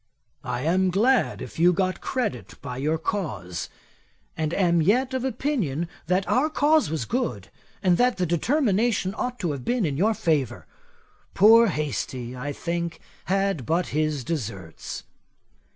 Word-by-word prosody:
'I 125 -1 -3
am 185 +5 +2
glad 230 +8 +2
if - - -9
you 175 +2 +5
got 185 +1 -1
credit 130 - -3
by 125 -3 -6
your 155 +4 0
cause, 110 - -3 0.7
and 155 -1 -1
am 170 -2 +2
yet 250 +10 +2
of 260 -1 -1
opinion, 220 - -1 0.2
that 185 +2 +1
our 280 +5 +2
cause 305 - +3
was 155 -6 -2
good, 170 - -2 0.3
and 180 -2 +4
that 250 -2 +3
the 180 - +1
determination 210 - +1
ought 250 +1 -3
to 175 -8 -1
have 140 -3 -5
been 240 - +1
in 140 -3 -1
your 215 +6 +2
favour. 150 - 0 0.7
Poor 225 +4 +7
Hastie, 130 - -3
I 135 +3 -4
think, 170 +2 -3 0.3
had 195 -4 0
but 170 +2 +1
his 155 -2 0
deserts. 105 - -5
175 Hz, 150 wpm, -25 LUFS, 145-225 Hz, 0.7 s, Poor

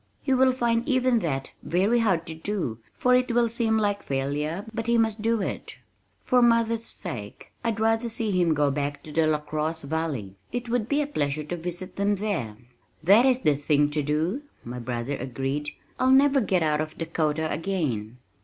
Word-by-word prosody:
He 270 - +1
will 260 0 +5
find 235 0 0
even 255 -2 +3
that 135 -8 -3
very 195 +8 +2
hard 190 -7 +1
to 160 - -6
do 160 - -3 0.2
for 250 - +3
it 250 0 +3
will 235 0 +3
seem 225 -1 +1
like 205 -2 0
failure 145 +7 -2
but 225 +1 -3
he 235 0 +3
must 220 -1 +1
do 225 -1 +1
it. - - -5 0.5
For 250 -1 +3
mother's 230 -1 +3
sake 120 - -7
I'd 230 -2 -1
rather 225 +1 +1
see 225 -1 -1
him 175 -4 +2
go 145 -1 +2
back 145 +1 -3
to 155 - -9
the 160 +1 +2
LaCrosse 155 +1 -1
valley. 140 -10 -3
It 245 +1 -3
would 235 -2 0
be 295 +1 +2
a - - -3
pleasure 150 - -2
to 155 +4 -4
visit 175 +2 -6
them 200 +1 +2
there." 180 - -3 0.5
"That 205 +9 +6
is 260 -1 +3
the 150 - +3
thing 145 0 +2
to 150 0 0
do," 155 - -1 0.2
my 125 +1 -6
brother 120 +3 -3
agreed. 135 +3 -3 0.3
"I'll 255 - +3
never 275 +1 +5
get 185 -5 +1
out 150 -1 +1
to - - -17
Dakota 160 -1 -1
again." 145 - -2
175 Hz, 190 wpm, -26 LUFS, 150-230 Hz, 0.5 s, That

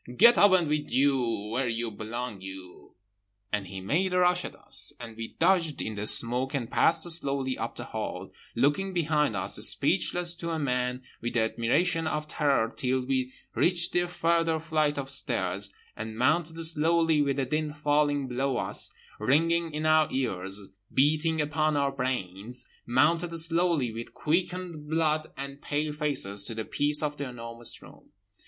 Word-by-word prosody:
Get 235 +2 +7
up 205 - +6 0.2
with 150 0 -2
you 125 -5 +1
where 130 +2 -1
you 115 0 -2
belong, 110 0 -6
you…." 95 -1 -11 0.6
—And 100 -2 -1
he 95 +1 -7
made 180 - 0
a - - +2
rush 180 0 +3
at - - -7
us, - - -3
and 115 -2 -9
we 115 0 -8
dodged 170 -6 +2
in 110 - -3
the 105 0 -2
smoke 125 +5 +5
and 120 -4 -3
passed 165 0 +3
slowly 135 -5 +2
up - - -5
the - - -6
hall, - - -6 0.2
looking 145 +10 +1
behind 150 - +1
us, 95 - -2
speechless 175 -1 +2
to 170 -1 -5
a 165 - -2
man 125 -3 -2 0.2
with 120 +1 -4
the 120 - +3
admiration 160 +10 +1
of 150 -1 -3
Terror 140 -7 0
till 130 0 -1
we 130 -1 -1 0.2
reached 170 -1 +1
the 175 0 +1
further 165 -2 0
flight 155 -2 0
of 140 -1 -3
stairs; 100 -6 0 0.3
and 110 0 -7
mounted 160 +6 +1
slowly, 165 0 +3
with 140 -1 0
the 135 -1 -1
din 155 +3 -2
falling 145 -2 0
below 130 +1 -1
us, - - +3 0.3
ringing 165 +8 +1
in 150 +1 -4
our 155 -1 +4
ears, 95 -6 -3 0.2
beating 155 +3 +2
upon 155 0 0
our 140 -1 +1
brains—mounted 125 - -1
slowly 165 -6 +2
with 115 +1 -8
quickened 170 -1 -2
blood 155 -1 0
and 140 +1 -7
pale 150 +1 -2
faces—to 120 -8 +2
the 110 -1 -4
peace 150 +1 +2
of 150 -1 -2
The 140 - -4
Enormous 115 -1 -3
Room. - - -17
145 Hz, 160 wpm, -27 LUFS, 120-160 Hz, 0.6 s, Get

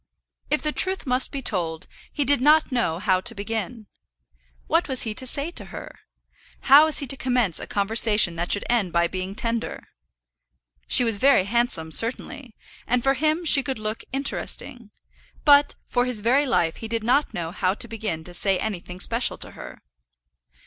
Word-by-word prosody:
If 300 - -1
the 305 - 0
truth 375 +3 -1
must 255 0 +3
be 275 -1 -6
told, 165 -7 -2 0.3
he 290 - -1
did 285 -1 +2
not 300 +2 +3
know 235 -10 -1
how 185 -1 0
to 230 +3 -2
begin. 220 +2 -5 0.8
What - - 0
was 260 -2 +1
he 220 - -3
to 260 +4 -5
say 285 +6 -3
to - - -5
her? - - -10 0.7
How 280 +3 +7
was 315 - +2
he 285 - -1
to 275 - +1
commence 245 -9 0
a - - -8
conversation 210 -3 +4
that 175 +1 -4
should 205 - 0
end 215 -8 0
by 170 0 +2
being 185 +2 -6
tender? 230 +1 -4 1.0
She 250 - +6
was 225 -3 0
very 275 -6 +4
handsome 200 -7 -1
certainly, 235 - -2 0.3
and 245 0 0
for 270 - +2
him 310 +5 -1
she 290 -3 +5
could 265 -1 -4
look 215 +1 -5
interesting; 265 -3 -3 0.6
but 285 -1 +5
for 245 -1 0
his 250 -4 -2
very 265 +6 +2
life 165 -9 0
he 225 - -7
did 225 0 -3
not 255 +6 +1
know 165 -1 -5
how 185 +1 -1
to 235 - -5
begin 210 -8 -5
to 175 - -11
say 190 +2 +1
anything 180 -3 -6
special 230 +5 -1
to - - -5
her. - - -12
230 Hz, 185 wpm, -23 LUFS, 195-270 Hz, 1.0 s, How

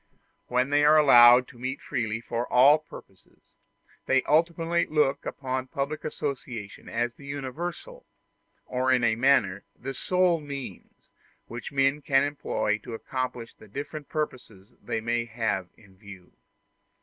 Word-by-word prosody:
When 125 +2 0
they 145 0 +4
are 150 +1 +6
allowed 125 -4 +7
to 120 - -16
meet 130 +3 -4
freely 110 -1 -3
for 120 +1 -4
all 140 +5 +6
purposes, 95 -10 -16 0.5
they 135 0 +3
ultimately 165 +2 +1
look 145 -2 +1
upon 130 -1 -4
public 145 +1 -4
association 125 -8 -6
as 120 +1 -1
the 140 - -15
universal, 170 - -6 0.6
or 130 +1 0
in 125 -2 +3
a 110 -1 +3
manner 115 -6 +2
the 135 +2 -6
sole 180 +2 +1
means, 140 - -9 0.3
which 115 -2 -8
men 135 +1 +1
can 135 -1 +3
employ 140 -7 -1
to 115 +2 -8
accomplish 125 -1 -5
the 110 - -17
different 145 +6 -7
purposes 125 - -5
they 110 - -3
may 120 +1 -1
have 110 -5 -2
in 100 -4 -20
view. 95 -3 -14
130 Hz, 140 wpm, -26 LUFS, 115-145 Hz, 0.6 s, allowed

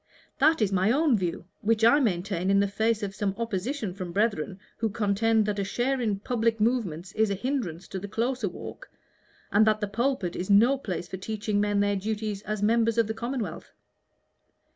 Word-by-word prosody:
"That 310 -3 +4
is 200 - 0
my 190 +3 +2
own 290 0 +3
view, 180 -3 -2
which 225 +1 +2
I 240 +6 +6
maintain 190 - 0
in 200 0 +4
the 200 - +3
face 220 +2 0
of 195 -1 -3
some 200 -1 -2
opposition 230 0 -3
from 185 -2 -6
brethren 200 -2 0 0.2
who 225 - 0
contend 215 +1 +2
that 205 -1 -1
a - - +1
share 250 +6 -1
in 215 -4 0
public 230 -1 0
movements 200 -7 0
is 220 +1 +1
a 200 - 0
hindrance 195 - -3
to 190 - -4
the 205 - -6
closer 230 +1 -1
walk, 175 - -9 0.6
and 210 - +5
that 215 0 +3
the 205 - -1
pulpit 215 -4 -1
is 185 - -4
no 225 +7 +6
place 180 -7 -4
for 190 - -6
teaching 210 +1 -2
men 205 -1 +1
their 205 0 +1
duties 210 0 -3
as 210 -1 -3
members 230 +1 +2
of 230 - +4
the 220 - -3
commonwealth. 235 +1 -4
210 Hz, 195 wpm, -27 LUFS, 195-230 Hz, 0.6 s, I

